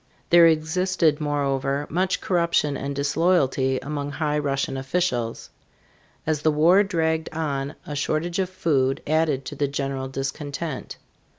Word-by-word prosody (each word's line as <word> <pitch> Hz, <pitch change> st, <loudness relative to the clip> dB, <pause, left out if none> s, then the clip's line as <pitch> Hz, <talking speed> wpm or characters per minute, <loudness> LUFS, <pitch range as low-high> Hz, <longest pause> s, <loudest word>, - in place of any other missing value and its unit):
There 170 Hz, -1 st, +8 dB
existed, 160 Hz, 0 st, +1 dB
moreover, 140 Hz, -1 st, -1 dB
much 185 Hz, +4 st, 0 dB
corruption 170 Hz, -5 st, +1 dB
and 140 Hz, +1 st, -4 dB
disloyalty 140 Hz, -3 st, +2 dB
among 145 Hz, +1 st, -4 dB
high 150 Hz, -1 st, 0 dB
Russian 135 Hz, -2 st, -1 dB
officials. 130 Hz, -4 st, -2 dB, 0.7 s
As 155 Hz, -2 st, 0 dB
the 155 Hz, -, +3 dB
war 165 Hz, +6 st, +5 dB
dragged 160 Hz, -5 st, 0 dB
on 145 Hz, -3 st, -3 dB
a 150 Hz, -, -5 dB
shortage 155 Hz, +5 st, -1 dB
of 185 Hz, -1 st, 0 dB
food 145 Hz, -8 st, 0 dB
added 155 Hz, -3 st, +1 dB
to -, -, -6 dB
the 145 Hz, -, 0 dB
general 135 Hz, -1 st, -3 dB
discontent. 140 Hz, +2 st, -5 dB
150 Hz, 130 wpm, -24 LUFS, 140-165 Hz, 0.7 s, There